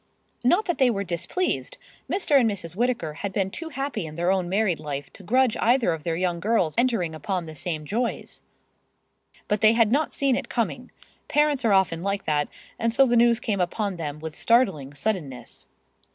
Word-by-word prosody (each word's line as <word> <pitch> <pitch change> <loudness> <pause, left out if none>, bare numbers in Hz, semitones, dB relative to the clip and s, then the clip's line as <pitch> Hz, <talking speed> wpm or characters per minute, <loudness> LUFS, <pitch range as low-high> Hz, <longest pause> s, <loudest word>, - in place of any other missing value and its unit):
Not 350 - +3
that 345 - -2
they 260 -2 +5
were 200 -4 -1
displeased! 175 - -2 0.3
Mr. 310 -7 +3
and 235 -3 +3
Mrs. 175 -5 -5
Whittaker 230 -9 -1
had 200 - -2
been 195 0 -1
too 330 +7 -6
happy 270 - -3
in 155 - -9
their 175 +2 +1
own 185 -2 0
married 195 -3 +1
life 145 -2 -6
to - - -13
grudge 250 +5 +2
either 240 -4 +3
of 160 - -5
their 165 -1 -1 0.2
girls 195 -5 +1
entering 230 -10 +1
upon 175 +3 -3
the 160 - -8
same 155 -1 -4
joys. 230 +8 -3 1.1
But 210 -1 0
they 220 0 +6
had 230 -2 +3
not 290 +4 +1
seen 275 -2 +1
it - - -4
coming. - - -2 0.4
Parents 295 -3 +2
are 220 -3 +3
often 185 -4 +2
like 200 +1 -2
that, 145 -1 +1 0.3
and 230 0 +1
so 270 +4 +5
the 240 -2 +2
news 235 0 +4
came 205 -5 -1
upon 195 +2 -2
them 150 -3 -4
with 155 0 -7
startling 190 - +2
suddenness. 135 - -4
200 Hz, 190 wpm, -25 LUFS, 165-240 Hz, 1.1 s, they